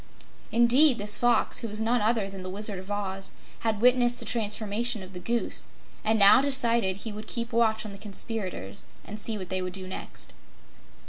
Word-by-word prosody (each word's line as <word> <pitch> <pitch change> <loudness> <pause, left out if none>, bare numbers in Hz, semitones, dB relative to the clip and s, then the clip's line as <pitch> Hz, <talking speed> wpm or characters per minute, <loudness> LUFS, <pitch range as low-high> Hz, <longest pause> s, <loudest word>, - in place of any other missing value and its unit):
Indeed, 245 +4 +6
this 210 0 +4
Fox, 240 +1 +2
who 235 - -4
was 210 0 -4
none 230 +2 +1
other 220 -1 +1
than 195 -1 -8
the 185 - -6
Wizard 200 0 -1
of 190 +1 -11
Oz, 195 -2 -3 0.3
had 220 -2 -1
witnessed 245 0 +4
the 230 - -3
transformation 215 0 -1
of 185 +1 -12
the 180 - -7
Goose 235 +6 -2 0.4
and 220 +1 +2
now 205 +5 +7
decided 235 -8 +1
he 220 +2 -6
would 210 +1 -8
keep 235 0 -3
watch 220 -2 +2
on 210 - -6
the 200 - -10
conspirators 195 - -5 0.2
and 210 0 -8
see 220 0 -2
what 185 -3 -7
they 185 -1 -1
would 185 0 -4
do 190 -1 -2
next. 185 - -6
215 Hz, 195 wpm, -27 LUFS, 195-235 Hz, 0.4 s, now